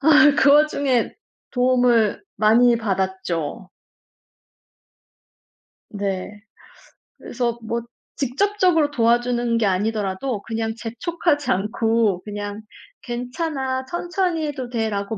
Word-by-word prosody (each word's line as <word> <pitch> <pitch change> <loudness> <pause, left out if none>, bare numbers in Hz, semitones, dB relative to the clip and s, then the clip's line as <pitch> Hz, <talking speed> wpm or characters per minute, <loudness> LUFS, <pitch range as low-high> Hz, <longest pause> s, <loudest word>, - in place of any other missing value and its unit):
아 300 +1 +7
그 280 -1 +5
와중에 285 -4 +2 0.4
도움을 245 - +2
많이 235 +3 +5
받았죠. 190 -5 -3 2.2
네. 200 0 -4 0.8
그래서 235 -2 -3
뭐 235 +1 -2 0.3
직접적으로 330 +2 +1
도와주는 240 -1 +1
게 230 - +1
아니더라도 205 +3 -1
그냥 225 -1 -3
재촉하지 290 +6 -1
않고 210 0 +1
그냥 205 0 -6 0.4
"괜찮아. 260 +1 -3
천천히 345 0 -1
해도 265 -4 -5
돼."라고 220 -3 -2
235 Hz, 215 characters per minute, -22 LUFS, 210-280 Hz, 2.2 s, 아